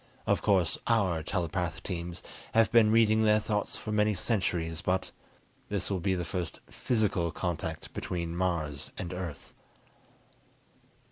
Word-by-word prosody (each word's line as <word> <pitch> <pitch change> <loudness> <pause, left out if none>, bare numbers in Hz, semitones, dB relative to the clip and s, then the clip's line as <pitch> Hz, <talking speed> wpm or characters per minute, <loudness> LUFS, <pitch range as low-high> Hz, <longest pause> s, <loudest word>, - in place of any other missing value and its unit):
Of - - +2
course 95 -5 +2
our 95 -8 +2
telepath 85 -1 -2
teams 90 -1 -4 0.3
have 115 -2 +5
been 115 -2 +6
reading 110 -1 +5
their 105 0 +5
thoughts 105 -1 -2
for 110 - -6
many 105 0 +3
centuries, 90 -5 -1
but 90 +1 0 0.6
this 100 -1 -2
will 95 - 0
be 95 +2 +1
the 90 -1 -2
first 90 -3 -3
physical 105 -8 +1
contact 85 -2 -4
between 85 -2 -3
Mars 85 -6 -1
and 90 0 -4
Earth." 85 -6 -6
90 Hz, 135 wpm, -30 LUFS, 85-105 Hz, 0.6 s, been